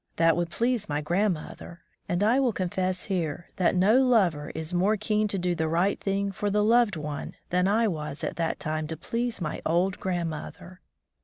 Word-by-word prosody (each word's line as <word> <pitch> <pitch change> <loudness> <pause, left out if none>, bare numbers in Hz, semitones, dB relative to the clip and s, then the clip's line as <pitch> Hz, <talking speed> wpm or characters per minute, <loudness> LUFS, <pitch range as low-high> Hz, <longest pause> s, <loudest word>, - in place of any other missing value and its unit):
That 165 -1 +4
would 170 0 -1
please 235 0 0
my 145 0 0
grandmother; 175 0 -2 0.3
and 175 +3 +1
I 235 +5 +4
will 255 -4 +2
confess 185 0 -1
here 170 -4 -3
that 185 0 +2
no 205 +7 +5
lover 190 - +2
is 160 +2 -5
more 195 +5 +2
keen 215 +1 +1
to 200 - -2
do 180 -1 0
the 160 -2 -1
right 175 +5 +1
thing 200 0 -1
for 205 +2 -2
the 210 +1 +2
loved 230 -2 +4
one 150 -2 -5 0.2
than 180 +1 +2
I 220 +3 +3
was 150 -5 -4
at - - -2
that 165 -1 -1
time 155 0 -2
to 160 0 -5
please 235 +7 -2
my 155 -3 -3
old 180 +4 +1
grandmother. 175 0 -4
180 Hz, 190 wpm, -27 LUFS, 165-210 Hz, 0.3 s, no